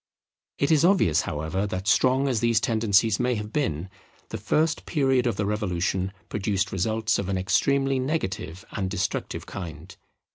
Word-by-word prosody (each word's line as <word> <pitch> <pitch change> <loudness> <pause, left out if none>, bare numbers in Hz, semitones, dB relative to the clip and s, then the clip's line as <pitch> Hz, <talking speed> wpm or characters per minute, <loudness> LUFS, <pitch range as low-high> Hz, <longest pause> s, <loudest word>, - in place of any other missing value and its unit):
It 140 - +1
is 155 -1 +4
obvious, 170 - +4
however, 80 +7 -2
that 95 0 -4
strong 130 +7 +3
as 125 -5 +1
these 115 0 +3
tendencies 110 -2 +2
may 125 0 +1
have 105 0 -6
been, 95 - -1 0.4
the - - -5
first 155 +1 0
period 135 -5 +2
of 115 - 0
the 100 - -1
Revolution 95 -2 -1 0.2
produced 100 -1 -1
results 110 +4 0
of 100 -1 -3
an 95 - 0
extremely 135 +8 +1
negative 95 - -3
and 95 -2 -2
destructive 90 0 -3
kind. 85 -6 -8
105 Hz, 155 wpm, -25 LUFS, 95-130 Hz, 0.4 s, is